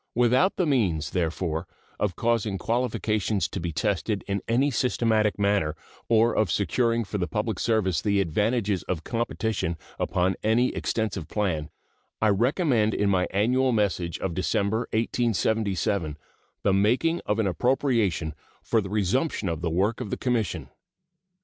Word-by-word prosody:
Without 125 - +3
the 180 - +1
means, 90 - +1
therefore, 85 -2 -2 0.3
of 100 -4 0
causing 115 -4 0
qualifications 110 -3 0
to - - -5
be 85 -1 -3
tested 100 +3 -1
in 100 -1 -1
any 130 +5 +2
systematic 115 -4 +1
manner 100 -7 +1 0.3
or 115 +1 +4
of 110 -4 +2
securing 115 +6 +1
for 105 0 -4
the 90 - -1
public 105 +7 -2
service 100 -8 +1
the 100 -2 +1
advantages 100 +3 0
of 85 -3 -3
competition 110 -7 -2 0.2
upon 95 0 +1
any 115 +4 +3
extensive 105 -7 -2
plan, 80 -6 -1 0.5
I 110 - +3
recommended 120 - +2
in 100 -1 +2
my 90 -1 +2
annual 125 +6 +2
message 90 -6 0
of 95 - -3
December, 100 +5 0
1877, 110 -7 0 0.5
the 100 - +3
making 125 - +2
of 105 - +1
an 110 - +1
appropriation 105 - +1 0.3
for 115 - +2
the 95 - -6
resumption 105 - 0
of 80 -1 -3
the 85 - -1
work 100 +9 0
of 115 - -4
the - - -2
Commission. 115 - -1
105 Hz, 145 wpm, -26 LUFS, 95-115 Hz, 0.5 s, or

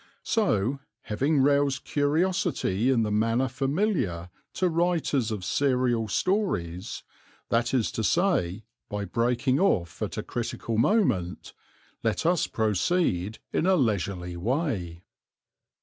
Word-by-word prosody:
So, 135 - +1 0.2
having 135 +7 +1
roused 140 -1 +2
curiosity 145 - +1
in 120 -4 +3
the 105 - -1
manner 115 +5 +2
familiar 135 - -1 0.2
to 185 - +2
writers 165 -7 +1
of 105 -4 -4
serial 125 -4 +1
stories, 105 - -1 0.5
that 115 +1 +1
is 125 -5 +1
to 110 - -3
say 110 - +1 0.3
by 105 0 -3
breaking 120 +6 +1
off 90 - +1
at - - -3
a - - -2
critical 115 -1 -3
moment, 120 - +1 0.5
let 115 +6 -1
us 175 -1 +2
proceed 110 - 0 0.2
in 170 - +1
a 190 - +5
leisurely 100 - -1
way. 95 - -2
120 Hz, 120 wpm, -27 LUFS, 105-155 Hz, 0.5 s, a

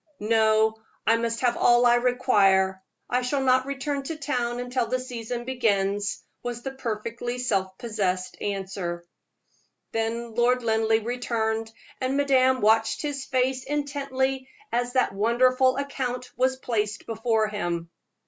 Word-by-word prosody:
"No, 220 0 +3 0.3
I 225 +2 +5
must 230 0 -2
have 245 -2 +2
all 240 0 +5
I 240 - +6
require; 205 -7 +3 0.3
I 250 +1 +1
shall 270 +2 0
not 260 0 +3
return 280 +1 -2
to 325 - -3
town 250 -5 -2
until 245 -1 -1
the 255 +2 0
season 240 -1 -5
begins," 205 -5 0 0.2
was 240 -1 -5
the 270 - -3
perfectly 235 -1 -4
self 195 -6 -1
possessed 190 -5 -2
reply. 190 -3 -3 0.9
Then 225 +1 -2
Lord 245 +2 +2
Linleigh 220 -1 +2
returned, 225 -2 -1 0.3
and 260 +1 0
madame 260 -2 +3
watched 220 +5 +3
his 280 -2 -3
face 255 0 0
intently 270 -2 -2 0.2
as 245 +1 -1
that 255 -6 +2
wonderful 255 +5 +3
account 255 -3 -3
was 260 +1 +2
placed 210 -5 -2
before 225 -1 +1
him. 170 -5 -3
240 Hz, 135 wpm, -26 LUFS, 220-255 Hz, 0.9 s, I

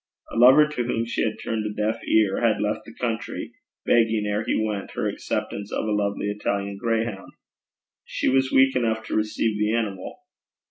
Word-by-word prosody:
A - - -7
lover 130 +6 +7
to 150 -5 -3
whom 115 -1 -1
she 115 - -2
had 110 -1 -1
turned 110 -1 -3
a 105 - -3
deaf 110 +2 -1
ear 105 -3 +3
had 115 -3 +2
left 105 +1 -2
the 115 - -12
country, 115 -2 -3 0.3
begging 115 -2 +3
ere 105 +1 -1
he - - 0
went 105 -2 -2
her - - -1
acceptance 100 0 -4
of - - -2
a 110 - -1
lovely 100 0 -1
Italian 100 -1 -3
grayhound. 115 -3 -2 0.7
She - - -3
was 130 0 +2
weak 135 0 +4
enough 110 -3 0
to - - -3
receive 110 0 0
the 105 +1 +1
animal. 105 - -4
110 Hz, 185 wpm, -24 LUFS, 105-115 Hz, 0.7 s, lover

